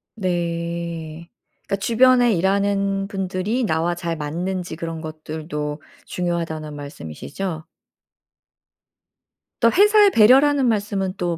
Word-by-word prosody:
네. 170 -3 -3 0.4
그니까 - - 0
주변에 245 +2 +4
일하는 195 +1 +1
분들이 195 +4 -2
나와 165 -3 0
잘 170 -1 -3
맞는지 175 +3 -4
그런 165 0 -5
것들도 155 -1 -5 0.3
중요하다는 165 -4 -3
말씀이시죠? 145 - -6 2.0
또 230 - +5
회사의 415 0 +6
배려라는 270 +5 +5
말씀은 200 -4 -1
또 175 -2 -2
180 Hz, 245 characters per minute, -21 LUFS, 160-205 Hz, 2.0 s, 회사의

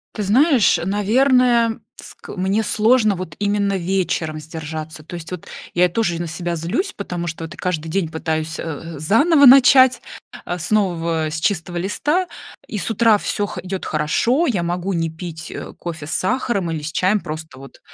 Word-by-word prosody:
Ты 210 - -2
знаешь, 255 - +4
наверное, 235 +3 +3 0.2
ск - - -9
мне 195 +4 +1
сложно 215 -1 +3
вот 170 -5 -7
именно 205 -1 +1
вечером 170 -4 -1
сдержаться. 155 0 -7
То 175 - -9
есть, 165 +1 -8
вот, 180 - -6 0.3
я 175 +1 +4
и - - +3
тоже 175 -4 -1
на 170 - -3
себя 170 +1 -3
злюсь, 220 - -2
потому 175 -4 -4
что, 165 0 -5
вот, 165 +3 -7
каждый 165 -3 -3
день 185 0 0
пытаюсь, 160 -1 -3
э - - -5
э, 160 -1 -6
заново 285 - +4
начать, 260 0 +7 0.4
а, 175 - -3
с 155 +4 -5
нового, 170 -6 +1
с 160 +1 -4
чистого 175 -1 -1
листа, 295 - 0 0.4
и 210 - -5
с 200 - -3
утра 225 -1 +4
всё 205 0 -2
хо 210 - -7
идёт 185 0 -5
хорошо, 230 - +1
я 195 - 0
могу 175 +3 -2
не 165 -1 -1
пить, 160 0 -8
э, - - -7
кофе 160 -4 -6
с 155 - -6
сахаром 200 -5 0
или 155 -2 -3
с 155 +1 -6
чаем, 190 +3 +2
просто 155 -5 -8
вот 135 - -13
180 Hz, 185 wpm, -20 LUFS, 160-220 Hz, 0.4 s, начать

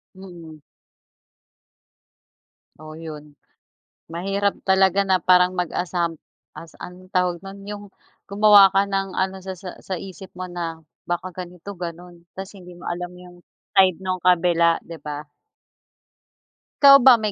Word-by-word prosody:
Mm. 170 -5 -12 2.2
Oh, 155 0 -10
'yon. 150 -2 -10 0.7
Mahirap 195 +4 -1
talaga 190 0 +3
na 190 -1 +2
parang 180 +1 +4
mag-asam 175 -1 -1 0.4
as 165 -1 -12
anong 185 +1 -11
tawag 180 -2 0
no'n, 195 +1 -10
'yong 205 0 -7 0.5
gumawa 205 -1 +7
ka 195 +1 +2
ng 195 -1 -3
ano 190 0 -2
sa 190 -1 -7
sa 185 -2 -8
sa 185 -3 -4
isip 190 0 -10
mo 185 - -4
na, 170 -2 -5 0.3
baka 175 0 -3
ganito, 180 +2 -8
gano'n. 175 0 -8 0.2
Tas 195 +2 -7
hindi 180 -2 -13
mo - - -11
alam 175 +1 -4
'yong 180 0 -14 0.4
side 185 -3 +5
no'ng 185 -1 -4
kabila, 170 -2 +3
'di 165 -1 -9
ba. 150 0 -6 1.6
Ikaw 275 -1 +10
ba 255 -1 +8
may 215 -2 -2
180 Hz, 135 wpm, -22 LUFS, 170-195 Hz, 2.2 s, Ikaw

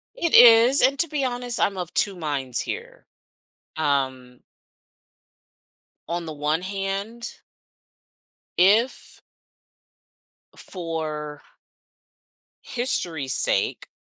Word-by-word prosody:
It 340 -9 -2
is, 240 +3 +7
and 270 +2 +3
to 335 - +1
be 290 -2 -2
honest, 245 -1 -1
I'm 200 - +1
of 175 -2 -5
2 200 -2 +1
minds 140 -7 -3
here. - - -7 0.7
Um 130 -4 -2 1.7
on 170 0 -3
the 160 - -6
one 150 +3 -2
hand 200 +4 -5 1.2
if 210 +8 +2 1.4
for 155 -4 -6 1.2
history's 170 - -1
sake, 110 - 0
185 Hz, 85 wpm, -23 LUFS, 150-240 Hz, 1.7 s, is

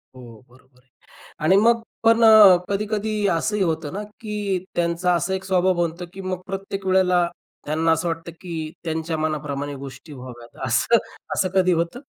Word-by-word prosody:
हो, 115 -4 -13
बरोबर 130 0 -24
आहे. 135 - -39 0.5
आणि 180 +5 +4
मग 230 +2 +4 0.2
पण 230 +1 +4
अ, 215 -5 +9
कधी-कधी 210 +1 -2 0.2
असंही 210 +5 -1
होतं 160 -2 -2
ना 205 +2 -4 0.2
की 205 -4 -3
त्यांचा 175 +1 +1
असा 175 +2 -1
एक 190 0 -3
स्वभाव 185 -1 +2
बनतो 170 +1 -3
की 195 - -8
मग 185 -1 -4
प्रत्येक 195 0 -5
वेळेला 180 -2 +3 0.4
त्यांना 160 +2 +1
असं 160 +2 0
वाटतं 165 0 -4
की 175 -2 -7 0.3
त्यांच्या 160 -1 -3
मनाप्रमाणे 145 -2 -3
गोष्टी 135 +3 -10
व्हाव्यात. 125 -2 -9
असं, - - +3 0.4
असं 185 - +1
कधी 185 -1 +4
होतं? 170 +8 -2
175 Hz, 165 wpm, -22 LUFS, 155-195 Hz, 0.5 s, अ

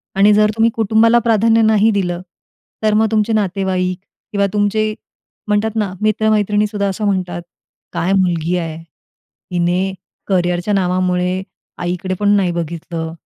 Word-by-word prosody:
आणि 200 +2 +5
जर 210 0 +4
तुम्ही 225 +1 +3
कुटुंबाला 225 +2 +4
प्राधान्य 225 0 +3
नाही 220 0 +4
दिलं, 180 -4 -1 0.6
तर 215 -1 +3
मग 220 +1 +3
तुमचे 220 0 +1
नातेवाईक 190 -3 -1 0.3
किंवा 200 -1 +1
तुमचे 215 +1 +1 0.5
म्हणतात 210 +1 +1
ना 210 -4 -1
मित्र-मैत्रिणीसुद्धा 210 -1 +1
असं 200 +2 -3
म्हणतात, 185 -3 -1 0.5
"काय 185 +3 0
मुलगी 175 -3 +1
आहे? 165 -2 -4 0.7
हिने 180 +2 0 0.3
करियरच्या 180 +1 0
नावामुळे 180 -1 0 0.4
आईकडे 180 +2 -2
पण 205 -1 +2
नाही 190 -3 +2
बघितलं 165 -1 -4
200 Hz, 125 wpm, -17 LUFS, 180-215 Hz, 0.7 s, आणि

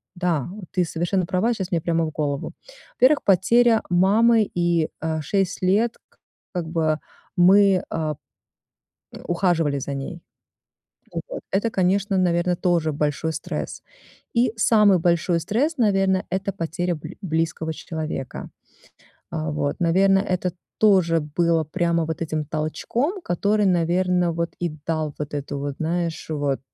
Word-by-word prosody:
да, 175 -4 -1 0.3
ты 180 - +3
совершенно 175 +3 -1
права, 190 +7 +1
щас 190 -4 -5
мне 170 -3 +1
прямо 165 -1 0
в - - -3
голову. 145 -2 -3 0.5
Во-первых, 280 +4 +6
потеря 225 +5 +4
мамы 215 +4 +4
и, 170 -2 +2
э, 160 0 -1
6 195 +5 -1
лет 210 +6 +2
к - - -32 0.4
как 175 -2 -2
бы 160 -2 0 0.4
мы, 195 +1 +5
э, 155 -2 -2 1.0
э, - - -10
ухаживали 170 -5 +1
за 140 +1 -4
ней. 135 +5 -6 1.1
Вот - - -6
это, 205 +4 +1
конечно, 195 0 +1
наверно, 175 0 +1
тоже 170 -4 +1
большой 150 +2 -1
стресс. 160 - -5 0.5
И 235 -1 +3
самый 210 -4 +5
большой 170 0 +1
стресс, 275 - 0
наверно, 195 -4 +2
это 195 +1 -1
потеря 175 0 -2
бл 155 0 -8
близкого 160 -1 -1
человека. 155 -5 -5 0.8
Э, 80 -1 -2
вот, 75 -1 -2
наверно, 195 +3 +4
это 185 -2 -1 0.3
тоже 185 -6 +4
было 165 +2 +1
прямо 170 +1 0
вот 160 +1 -4
этим 155 -1 -2
толчком, 165 - -2
который, 205 +4 +1
наверно, 180 0 +2
вот 170 0 -3
и 175 - 0 0.2
дал 155 -3 -1
вот 150 -1 -5
эту 145 0 -4
вот, 140 0 -4
знаешь, 165 0 -2
вот 145 -3 -1
175 Hz, 140 wpm, -23 LUFS, 160-195 Hz, 1.1 s, Во-первых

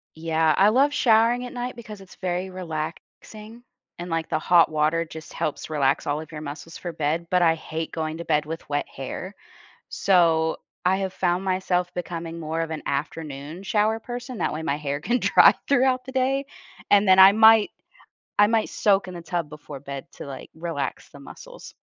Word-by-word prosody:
Yeah, 160 -1 +1
I 200 +2 +6
love 275 +6 +3
showering 235 +1 +3
at 245 - -8
night 245 0 -4
because 220 -4 -10
it's 190 -1 -15
very 185 0 -3
relaxing 185 +7 -7 0.3
and, 175 +1 -7
like, 165 -1 -2
the - - +1
hot 175 +1 +4
water 155 +2 +1
just 160 0 -11
helps 150 - -3
relax 140 -4 +1
all 145 +2 -1
of 160 - -12
your 150 -1 -7
muscles 155 +3 -8
for 175 - -6
bed, 160 +2 -2
but 180 0 +3
I 165 -1 +4
hate 160 0 -5
going 160 0 -3
to 170 - -7
bed 150 -1 +1
with 160 +1 -7
wet 145 0 -1
hair, 135 +8 -7 0.6
so 165 -4 +2 0.3
I 185 +1 +3
have 190 -1 -3
found 180 +1 0
myself 185 -1 -1
becoming 170 -1 -5
more 160 +1 -3
of 165 -1 -4
an 155 - -4
afternoon 145 +2 -4
shower 215 +2 +1
person. 245 +1 -7
That - - -1
way 155 - -4
my 145 -1 -1
hair 145 -1 -3
can 240 +10 0
dry - - +6
throughout 260 -1 +2
the 260 - -8
day 265 +1 0 0.4
and 205 0 +5
then 185 - +6
I 190 +1 +10
might 220 0 +6 0.7
I 205 - +7
might 225 0 +1
soak 200 -2 +2
in 185 - -7
the 170 - -7
tub 165 -2 -3
before 150 -2 -10
bed 140 -1 -8
to, - - -9
like, 135 -2 -9
relax 160 -4 -4
the 140 - -14
muscles. 140 - -12
170 Hz, 195 wpm, -24 LUFS, 155-210 Hz, 0.7 s, I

